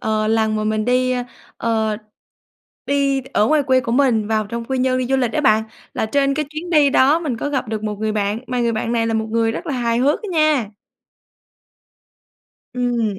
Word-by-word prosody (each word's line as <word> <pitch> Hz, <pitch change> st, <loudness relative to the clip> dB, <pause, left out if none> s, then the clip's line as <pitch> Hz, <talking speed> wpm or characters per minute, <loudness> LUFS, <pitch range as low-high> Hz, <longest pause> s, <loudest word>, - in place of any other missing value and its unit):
ờ, 215 Hz, -1 st, 0 dB
lần 220 Hz, -1 st, +1 dB
mà 215 Hz, -, -2 dB
mình 215 Hz, 0 st, 0 dB
đi, 255 Hz, +1 st, +2 dB, 0.4 s
ờ 220 Hz, -2 st, 0 dB, 0.9 s
đi 275 Hz, -1 st, +1 dB
ở 210 Hz, -, +4 dB
ngoài 305 Hz, +1 st, +3 dB
quê 260 Hz, -1 st, +3 dB
của 230 Hz, -, -3 dB
mình 240 Hz, -5 st, +2 dB
vào 215 Hz, -1 st, 0 dB
trong 235 Hz, +2 st, -5 dB
Quy 265 Hz, +1 st, -2 dB
Nhơn 255 Hz, 0 st, +1 dB
đi 255 Hz, -, -1 dB
du 270 Hz, +2 st, +1 dB
lịch 245 Hz, -4 st, 0 dB
á -, -, 0 dB
bạn, 220 Hz, -6 st, +4 dB, 0.3 s
là -, -, -1 dB
trên 275 Hz, +4 st, +1 dB
cái 300 Hz, +1 st, -1 dB
chuyến 315 Hz, +3 st, -6 dB
đi 300 Hz, -4 st, +4 dB
đó 275 Hz, +4 st, +4 dB
mình 300 Hz, -8 st, -3 dB
có 290 Hz, -, -3 dB
gặp 265 Hz, -4 st, -2 dB
được 215 Hz, -1 st, -3 dB
một 210 Hz, -1 st, -3 dB
người 220 Hz, 0 st, -1 dB
bạn 205 Hz, 0 st, -1 dB
mà 250 Hz, 0 st, -2 dB
người 235 Hz, -1 st, +1 dB
bạn 230 Hz, +1 st, -2 dB
này 230 Hz, -1 st, +1 dB
là 225 Hz, -, -1 dB
một 220 Hz, 0 st, -1 dB
người 225 Hz, 0 st, +1 dB
rất -, -, -6 dB
là 285 Hz, -, -2 dB
hài 235 Hz, -1 st, 0 dB
hước 280 Hz, +4 st, +1 dB
á -, -, -5 dB
nha. 305 Hz, -, +2 dB, 2.0 s
Ừm. 235 Hz, -5 st, -1 dB
240 Hz, 220 wpm, -20 LUFS, 220-270 Hz, 2.0 s, ở